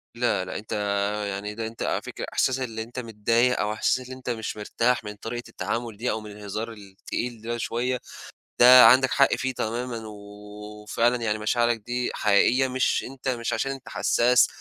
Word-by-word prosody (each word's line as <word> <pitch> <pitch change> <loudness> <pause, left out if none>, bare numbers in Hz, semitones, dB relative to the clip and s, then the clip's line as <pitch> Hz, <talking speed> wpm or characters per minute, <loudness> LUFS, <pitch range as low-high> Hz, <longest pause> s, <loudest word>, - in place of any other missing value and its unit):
لا، 120 -6 0
لأ، 90 - -5
أنت 110 - -10 0.6
يعني 100 +1 -5
ده 115 -1 -3
أنت 115 - -6
على - - -1
فكرة - - -6
إحساس 130 0 +1
اللي 115 -3 -4
أنت 120 +3 -8
متضايق 115 +2 +1
أو 105 +1 0
إحساس 130 +3 +1
اللي 130 0 -9
أنت 130 -1 -7
مش 110 -2 -3
مرتاح 115 +3 0
من 105 0 -7
طريقة 120 +4 -6
التعامل 115 -2 -4
دي 120 +3 -1
أو 110 - -3
من 105 -1 -10
الهزار 105 +2 -5
التقيل 105 +3 -6
ده 120 +1 -3
شوية، 125 +2 -2 0.6
ده 125 0 +10
عَندك 130 +3 +6
حق 135 - +4
فيه 130 0 -2
تمامًا، 115 -1 -4
و 110 - -8 0.7
وفعلًا 115 +3 +1
يعني 110 -1 0
مشاعرك 120 +2 +1
دي 120 +3 -3
حقيقية 120 +5 +3
مش 130 0 0
أنت 135 +1 -9
مش 120 -2 -2
عشان 135 +4 -1
أنت 135 -1 -8
حساس 125 +1 +3
115 Hz, 185 wpm, -25 LUFS, 110-125 Hz, 0.7 s, ده